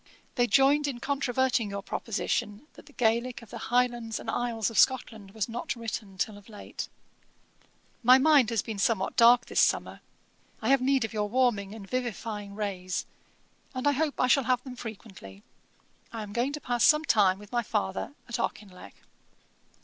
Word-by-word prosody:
They 245 0 +2
joined 280 +3 +4
in 260 -4 -4
controverting 260 -4 0
your 200 0 -5
proposition, 210 +2 -3
that - - -16
the 290 - -16
Gaelick 235 0 0
of 220 - -16
the - - -7
Highlands 240 -2 0
and - - -4
Isles 230 -2 -1
of 215 - +1
Scotland 225 -5 +2
was 220 - -1
not 240 +2 -4
written 220 -4 -6
till 205 +2 -2
of 205 - -19
late.' 210 -2 -7 1.1
'My 250 +1 +7
mind 280 -4 +5
has 230 -4 0
been 215 -3 -6
somewhat 195 -2 0
dark 235 0 +6
this - - +1
summer. - - +1 0.6
I - - -2
have 275 -1 +4
need 265 -2 +2
of 225 - -8
your 210 -1 -1
warming 220 -4 +1
and 200 -3 -10
vivifying 220 -4 -4
rays; 190 -3 -3 0.7
and 255 - -3
I - - +6
hope 295 +1 -1
I - - +4
shall 255 +1 +3
have 250 0 +1
them 255 -2 -8
frequently. 195 - -10 0.7
I 225 -2 -5
am 205 -1 -9
going 245 +5 0
to 300 - -4
pass 245 -4 -1
some 305 +1 +5
time 195 -8 +4
with 210 0 -14
my 240 -1 +1
father 95 - -3
at 235 - -4
Auchinleck.' 195 -4 -6
230 Hz, 180 wpm, -28 LUFS, 205-255 Hz, 1.1 s, My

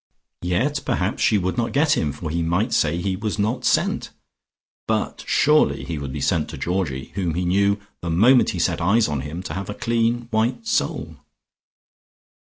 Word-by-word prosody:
Yet 125 +12 0
perhaps 100 -6 -1
she 110 - +4
would 95 +5 -1
not 115 - -1
get 150 +2 +3
him, 75 - 0
for 75 +2 -6
he 85 +1 -1
might 90 +8 0
say 80 +2 +2
he 95 +1 -1
was 105 +1 -3
not 110 +5 -1
sent. - - +1 0.8
But - - -1
surely 150 +1 +3
he 80 -3 -4
would 70 -2 -5
be - - -5
sent 75 - 0
to - - -7
Georgie, 85 -8 -2
whom 90 -5 -2
he 90 +1 -1
knew, 100 +3 +2 0.2
the 85 - -4
moment 115 +10 +5
he 95 - -3
set 85 0 0
eyes 105 +7 +3
on 75 -3 -2
him 75 +6 -6
to 75 - -5
have 95 +3 -5
a 105 - -4
clean 115 +1 0
white 115 +2 0
soul.... - - -1
95 Hz, 185 wpm, -22 LUFS, 85-115 Hz, 0.8 s, moment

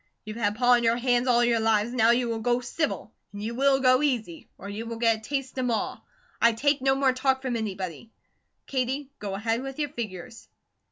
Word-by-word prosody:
You've 215 +1 -7
had 205 -2 0
Pa 245 +2 +3
on 240 -1 +5
your 230 0 +3
hands 245 0 +1
all 240 -1 +4
your 235 -1 +2
lives, 220 +1 +1
now 230 -2 +4
you 240 +1 +3
will 230 -1 -2
go 240 +2 +1
civil, 250 +6 -3 0.2
and 205 0 -7
you 225 +2 -3
will 270 +2 +3
go 255 0 +4
easy, 235 - -2
or 195 - -9
you 215 +3 -6
will 230 0 -5
get 230 -1 +3
a - - -14
taste 265 +2 -4
of 255 - 0
Ma. 230 -2 -2 0.4
I 235 0 +5
take 285 +4 +1
no 270 0 +3
more 270 -1 +2
talk 265 +1 0
from 255 -2 -2
anybody. 195 -3 -5 0.6
Katie, 265 +1 -2
go 200 -2 -4
ahead 225 +3 -1
with 270 0 -7
your 295 -1 -1
figures." 225 -3 -7
240 Hz, 220 wpm, -26 LUFS, 220-260 Hz, 0.6 s, on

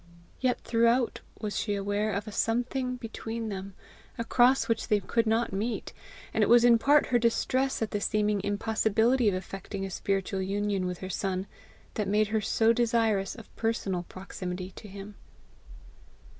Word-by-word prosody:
Yet 255 -1 +1
throughout 235 +1 +2 0.2
was 210 -2 -3
she 205 -2 -1
aware 205 +2 -1
of 200 +2 -3
a - - -5
something 245 +4 0
between 225 -1 -5
them, 195 -1 -6 0.4
across 245 +3 +3
which 230 -1 0
they 210 - +3
could 230 +4 0
not 225 -1 +1
meet; 220 +5 -3 0.4
and - - +3
it - - +2
was 240 0 +7
in 235 -1 +6
part 290 +4 +5
her 245 - +2
distress 255 +2 +1
at 220 - -4
the 205 - -2
seeming 210 -1 +1
impossibility 220 +3 +2
of 190 - -1
effecting 195 +1 -5
a 190 - -6
spiritual 195 0 -1
union 200 -1 -1
with 180 -1 -3
her - - -6
son, 190 +1 -2 0.5
that 210 -3 -2
made 210 +1 +2
her 220 0 +1
so 225 +2 +3
desirous 225 -4 +1
of 225 -3 -14
personal 215 -5 -1
proximity 185 -1 -6
to 210 - -11
him. 200 +1 -9
215 Hz, 165 wpm, -28 LUFS, 195-230 Hz, 0.5 s, was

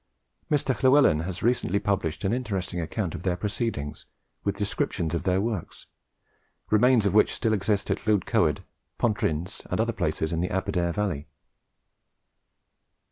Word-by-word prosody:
Mr. 140 -3 +2
Llewellin 130 - +5
has 95 -1 -5
recently 115 -5 +2
published 95 -6 -1
an 95 +2 +1
interesting 95 -8 -2
account 80 - -3
of - - -6
their 90 -2 0
proceedings, 100 - -3 0.4
with - - -1
descriptions 80 -1 -1
of 85 - 0
their 95 0 +2
works, 105 -4 -4 0.9
remains 115 +1 +5
of 100 - +2
which 105 - +5
still 115 -3 +1
exist 100 0 0
at - - 0
Llwydcoed, 105 -4 +1 0.3
Pontyryns, 95 -5 -1
and - - -1
other - - +1
places 80 +1 -1
in 80 - 0
the 90 - -1
Aberdare 95 -2 0
valley. 90 -7 -2
100 Hz, 140 wpm, -26 LUFS, 85-110 Hz, 0.9 s, Llewellin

